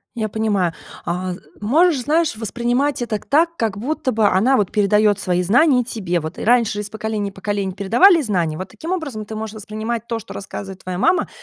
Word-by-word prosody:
Я 220 -2 -2
понимаю. 205 -6 0 0.3
А 180 +1 -2 0.3
можешь, 295 +7 +3
знаешь, 310 -1 +1
воспринимать 240 +5 -1
это 235 -3 -1
так, 335 +3 +1
как 220 -4 -1
будто 260 +2 -2
бы 220 -1 +2
она 230 +8 +3
вот 200 -3 0
передаёт 210 0 +3
свои 180 -2 0
знания 250 - +4
тебе 190 -8 -2
вот. 160 +2 -6
Раньше 225 -3 +2
из 210 - -6
поколения 215 -2 -3
в - - -23
поколение 195 -1 -3
передавали 275 - +5
знания. 175 - 0
Вот 185 0 -6
таким 315 - -7
образом 280 -13 -3
ты 220 +1 -7
можешь 220 0 -5
воспринимать 220 +2 -4
то, 230 -1 -2
что 220 - -10
рассказывает 195 -1 -7
твоя 180 -1 -4
мама, 365 - +2
215 Hz, 190 wpm, -20 LUFS, 200-245 Hz, 0.3 s, передавали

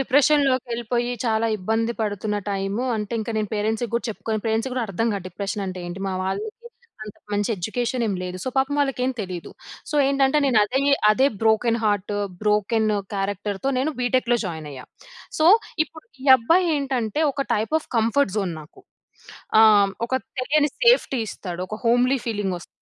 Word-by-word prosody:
డిప్రెషన్‌లోకెళ్ళిపోయి 255 -4 +2
చాలా 225 -1 +1
ఇబ్బంది 225 +4 -1
పడుతున్న 210 0 -2
టైము, 195 +4 -2
అంటే 210 +1 -4
ఇంక 225 +2 -4
నేను 215 -2 -1
పేరెంట్స్‌కి 220 +2 -1
గూడా 235 - 0
చెప్పుకోను 220 0 -3
పేరెంట్స్‌కి 225 +4 0
గూడా 250 -2 -1
అర్థం 210 +4 -1
గాదు. 195 -3 -4
డిప్రెషనంటే 195 0 -4
ఏంటి? 175 +2 -7
మా 190 - -2
వాళ్ళకి, 300 - -2 0.6
అంత 210 - -10 0.2
మంచి 205 +2 0
ఎడ్యుకేషనేం 230 +3 -2
లేదు. 180 0 -5
సో, - - -2
పాపం 270 +2 +1
వాళ్ళకేం 265 -2 0
తెలీదు. 180 -4 -6 0.4
సో, 300 - -1
ఏంటంటే 275 +1 +3
నేనదే 245 0 +3 0.3
అదే 260 +6 +4 0.2
బ్రోకెన్ 225 +1 +3
హార్ట్, 205 -1 0 0.3
బ్రోకెన్ 210 +1 +1 0.3
క్యారెక్టర్‌తో 200 +4 -2
నేను 290 +5 0
బీటెక్‌లో 245 -1 +1
జాయినయ్యా. 150 -6 -7 0.5
సో, 310 - +2 0.4
ఇప్పుడు 315 +1 -15 0.2
ఈ - - -5
అబ్బాయేంటంటే, 275 - +1
ఒక 275 0 -2
టైప్ 220 +8 -1
ఆఫ్ - - -18
కంఫర్ట్ 230 0 +2
జోన్ 185 -5 -2
నాకు. 150 - -18 0.8
ఆహ్, 210 -3 +6 0.2
ఒక 240 - -15 0.3
తెలియని 290 +3 +2
సేఫ్టీ 470 - +4
ఇస్తాడు. 180 -3 -6
ఒక 215 - -5
హోమ్‌లీ 250 +3 +3
ఫీలింగొస్ 200 -6 -3
225 Hz, 145 wpm, -23 LUFS, 205-260 Hz, 0.8 s, ఆహ్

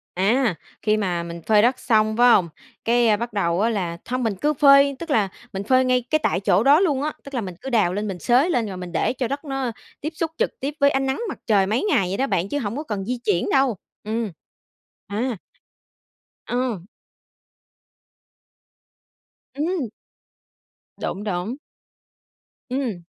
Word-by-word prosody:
À, 210 +2 +2 0.3
khi 215 0 +2
mà 180 -4 -1
mình 170 0 -7
phơi 210 -1 +5
đất 250 +3 +2
xong 215 -2 +2
phải 245 0 +6
hông, 170 -3 +1 0.4
cái 230 -2 +3
bắt 235 -1 -5
đầu 175 -2 +1
á 225 - +3
là 180 -6 -2
hông 255 0 -1
mình 220 -4 0
cứ 300 +1 +2
phơi 280 0 +6
tức 335 - -7
là 205 -6 +2 0.2
mình 195 0 -3
phơi 255 +4 +3
ngay 255 0 +3
cái 310 - +3
tại 180 - +1
chỗ 195 +1 +2
đó 285 +5 +6
luôn 290 -8 +1
á. 305 0 -1
Tức 280 - -11
là 245 - -1
mình 185 -3 -6
cứ 270 - -5
đào 210 -8 +2
lên, 210 +2 -2
mình 190 -3 -5
xới 255 - +3
lên 235 -9 +1
rồi 190 - -6
mình 180 -1 -7
để 170 - 0
cho 255 -1 -2
đất 280 +4 -4
nó 270 -3 -2 0.3
tiếp 310 +3 -4
xúc 320 0 -2
trực - - -1
tiếp 280 +2 -3
với 280 - +5
ánh 270 0 0
nắng 265 +10 -1
mặt - - -5
trời 200 -4 +3
mấy 220 +4 0
ngày 195 - +2
vậy 195 - -2
đó 270 - +1
bạn, 185 -5 0
chứ 290 - -1
hổng 225 -1 -3
có 300 - -3
cần 205 -9 -4
di 250 +2 -2
chuyển 175 - +1
đâu. 265 -6 +2 0.3
Ừm. 220 -1 -2 0.8
À. 225 +2 -2 1.1
Ờ. 245 -6 -1 2.7
Ừm. 310 -4 -1 1.1
Đúng, 200 - -4
đúng. 200 +4 -2 1.1
Ừm. 245 -9 -2
235 Hz, 185 wpm, -23 LUFS, 200-270 Hz, 2.7 s, phải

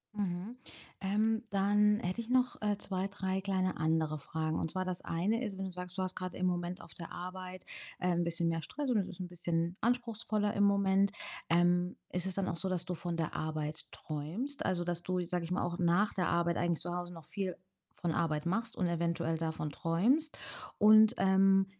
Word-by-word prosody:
Mhm. 200 +3 -3 0.4
Ähm, 220 +4 +1
dann 205 +1 +4
hätte 185 +6 -2
ich 230 - -10
noch, 250 0 +2
äh, 210 -1 +1
2, 190 -1 -2
3 190 -1 -2
kleine 190 -1 0
andere 155 -1 +1
Fragen. 155 +2 -2
Und 160 - -1
zwar 185 0 -1
das 185 -1 -3
eine 205 +9 0
ist, 205 -5 -4
wenn 195 - -3
du 190 - -4
sagst, 180 0 -7
du 190 - +1
hast 185 - -2
grad 185 -1 -4
im 185 - -1
Moment 175 0 -1
auf - - -13
der 170 - -9
Arbeit, 185 +1 -7 0.3
äh, 180 - +1
'n 175 0 +2
bisschen 170 0 0
mehr 165 0 0
Stress 285 - -4
und 235 - +3
es 195 - +1
ist 180 - -7
'n 180 - -3
bisschen 170 0 -1
anspruchsvoller 225 -3 0
im 205 - +2
Moment, 200 0 +4 0.4
ähm, 175 +1 +3
ist 180 +1 -1
es 190 - -2
dann 195 -1 0
auch 170 - -2
so, 190 +3 -2
dass 180 -1 -1
du 180 - -2
von 170 0 -3
der 160 - -1
Arbeit 155 -1 -3
träumst? 170 - -4
Also, 175 -2 +1
dass 175 0 -2
du, 185 0 -1
sage 175 -1 -2
ich 175 - -7
mal, 180 - +1
auch 175 +1 -2
nach 180 +4 +3
der 180 -2 +1
Arbeit 170 0 +2
eigentlich 170 -2 +1
zu 175 0 -3
Hause 175 0 -4
noch 165 -2 -11
viel 190 -1 -3 0.4
von 175 - -2
Arbeit 160 -2 0
machst 225 +6 -1
und 185 - 0
eventuell 170 -1 0
davon 160 -2 -2
träumst? 235 - +1 0.4
Und, 215 +2 +7
ähm, 195 0 +5
180 Hz, 210 wpm, -33 LUFS, 170-200 Hz, 0.4 s, Und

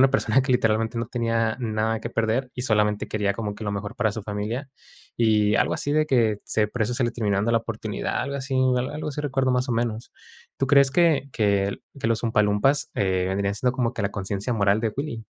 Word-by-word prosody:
una 135 0 +6
persona 135 -1 +2
que 135 - -3
literalmente 115 -1 +1
no 115 - -2
tenía 115 -2 0
nada 110 -1 -1
que 115 - -5
perder 115 +4 0
y 125 - -3
solamente 105 -3 +1
quería 105 -2 0
como 105 -1 -4
que 105 - -10
lo 105 - -2
mejor 100 0 -4
para 110 -3 +1
su 110 - -5
familia. 105 +6 -4 0.5
Y 105 -2 +3
algo - - +2
así 145 - -2
de 155 +1 +2
que, 115 -7 +2
se 105 -1 +2
por 110 +2 -3
eso 110 +3 0
se 130 0 +1
le 120 - -1
termina 105 -4 0
dando 110 +4 +1
la 115 - +4
oportunidad, 110 -2 -3
algo 140 - -3
así 135 0 -4 0.2
algo 150 +5 -3
así 150 0 -4
recuerdo, 135 -3 0
más 125 +2 0
o 125 - 0
menos. 115 0 -2 0.5
¿Tú 135 - 0
crees 140 -1 +5
que 155 -3 +3
que 100 -2 +1 0.3
los 115 0 +1
Oompa 110 -2 +3
Loompas, 105 +8 +2
eh, 95 -2 +1
vendrían 100 +1 -1
siendo 125 +5 +1
como 125 -3 -1
que - - -3
la 100 - 0
conciencia 100 +4 -3
moral 100 -1 +2
de 110 -2 -1
Willy? 135 -6 -4
115 Hz, 225 wpm, -24 LUFS, 105-130 Hz, 0.5 s, una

